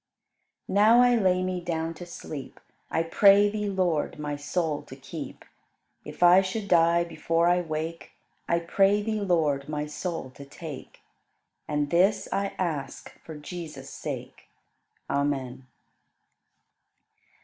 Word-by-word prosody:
20. - - -6
Now 225 +3 +7
I 245 0 +5
lay 185 -4 +2
me 185 -1 -2
down 165 -1 -2
to 175 +1 -10
sleep; 150 -5 -8 0.3
I 165 - +1
pray 200 +4 +5
Thee, 210 -1 -2
Lord, 180 -7 0
my 150 -1 -3
soul 150 +1 -2
to - - -12
keep. - - -8 0.6
If - - -4
I 180 +2 +8
should 200 +2 -4
die 170 -1 +4
before 170 0 0
I 180 0 +3
wake. 160 0 -5 0.4
I 170 0 +2
pray 195 +4 +2
Thee, 215 0 -2
Lord, 155 -7 +1
my 150 -1 -2
soul 150 -2 -5
to 140 - -12
take; 145 0 -10 0.7
And 150 -1 -1
this 185 +5 +3
I 200 0 -1
ask 160 -7 -4
for 160 - -10
Jesus' 150 -3 -8
sake. - - -7 0.6
Amen. 135 -2 -2
170 Hz, 135 wpm, -27 LUFS, 150-185 Hz, 0.7 s, I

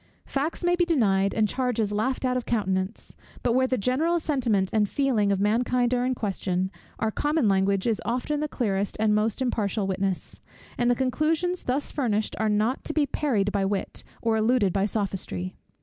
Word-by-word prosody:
Facts 295 +6 -2
may 350 0 +3
be 355 - +2
denied, 200 - +2
and 220 -1 +2
charges 235 -4 0
laughed 250 +6 -1
out 255 0 +1
of 250 - -2
countenance: 190 -2 -2 0.3
but 240 - +2
where 260 +1 +3
the 255 - 0
general 275 - +1
sentiment 240 -11 +1
and 210 -2 +2
feeling 240 -8 +1
of 195 - +1
mankind 240 +4 +2
are 245 0 +1
in 255 - 0
question, 190 -3 -2 0.3
our 220 0 0
common 295 0 +1
language 195 0 +2
is 225 -3 0
often 255 +5 -1
the 305 - -1
clearest 205 -8 -1
and 215 -1 +3
most 215 +4 +1
impartial 215 -4 -1
witness; 190 -1 -2 0.4
and 240 0 +1
the 245 - +4
conclusions 310 +8 0
thus 265 +3 -1
furnished, 220 -6 -1
are 220 0 +1
not 215 +5 +1
to 310 - -3
be 305 -2 +2
parried 225 -9 0
by 200 -1 0
wit, 195 0 -2 0.2
or 225 -1 +2
eluded 220 -4 +2
by 195 +1 +1
sophistry. 190 - -3
225 Hz, 185 wpm, -26 LUFS, 200-260 Hz, 0.4 s, the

